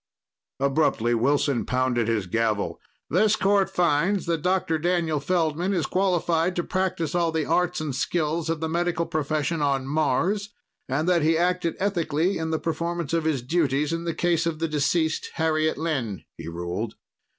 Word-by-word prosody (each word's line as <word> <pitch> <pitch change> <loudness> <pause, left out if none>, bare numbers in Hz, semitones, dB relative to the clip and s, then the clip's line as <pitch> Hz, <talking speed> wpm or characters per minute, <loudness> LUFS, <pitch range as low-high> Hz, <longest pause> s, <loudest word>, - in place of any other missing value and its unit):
Abruptly 135 -4 +2
Wilson 135 +2 +2
pounded 125 -3 0
his 110 -4 0
gavel. 110 +2 -1 0.3
"This 210 +6 +4
court 195 -1 +2
finds 180 +2 +1
that 165 -2 -1
Dr. 180 -3 +1
Daniel 165 -2 +1
Feldman 170 +4 0
is 170 - 0
qualified 180 -2 +1
to 175 - 0
practice 185 -5 -1
all 170 -2 +1
the 160 -2 -1
arts 180 0 +1
and 155 -3 -3
skills 160 +3 -1
of 165 -1 -1
the 160 - 0
medical 170 0 0
profession 155 +1 -1
on 140 -2 +1
Mars 160 +8 0 0.4
and 150 +6 0
that 175 -2 +3
he 160 +2 +3
acted 175 -1 +1
ethically 175 -2 0
in 160 0 -2
the 160 - 0
performance 170 -1 -3
of 165 -1 +1
his 145 -6 0
duties 150 0 +1
in 165 0 -2
the 165 -2 -2
case 170 -1 +1
of 165 -2 -2
the 165 +1 -1
deceased 155 +1 0
Harriet 155 -1 +1
Lynn," 135 - -2
he 80 - -9
ruled. 85 +6 -4
160 Hz, 165 wpm, -25 LUFS, 145-175 Hz, 0.4 s, This